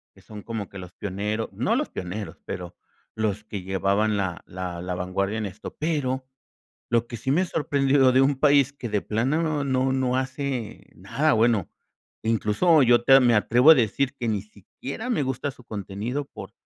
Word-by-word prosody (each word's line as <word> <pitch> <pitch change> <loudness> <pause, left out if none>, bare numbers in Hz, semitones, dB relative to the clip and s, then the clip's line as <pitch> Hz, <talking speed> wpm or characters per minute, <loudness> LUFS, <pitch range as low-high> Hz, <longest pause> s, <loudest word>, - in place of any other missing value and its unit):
que - - -19
son 105 -1 -11
como 110 -4 -5
que 100 - -10
los 90 -1 -10
pionero 105 +3 -3
no - - 0
los - - -1
pioneros, 95 +3 -6
pero 90 -1 -7 0.4
los 105 -1 -1
que 100 -3 -7
llevaban 100 +3 +1
la 95 -4 -2
la 90 -1 -6
la 90 0 -3
vanguardia 95 +4 -2
en 110 - -2
esto, 100 +3 -8
pero 135 -5 -1 0.7
lo 120 0 +2
que 120 - -7
sí 115 +4 -3
me 180 +7 +2
sorprendió 140 -4 +2
de 130 - +5
un 135 0 +2
país 140 -1 +4
que 120 -5 -6
de 105 - +1
plano 125 +11 0
no 155 -3 -1
no 130 -1 +1
no 130 -1 0
hace 130 -3 -4
nada - - 0
bueno, 110 -4 +2 0.5
incluso 115 +9 +3
yo 120 -1 +5
te 135 +2 +7
me 120 -2 +4
atrevo 120 +7 +5
a - - +11
decir 130 +2 0
que 120 -4 -3
ni 105 -3 -1
siquiera 120 - -8
me 205 -12 +1
gusta 130 +2 -2
su 125 -2 -17
contenido 110 +7 -4
por - - -10
115 Hz, 185 wpm, -25 LUFS, 105-135 Hz, 0.7 s, a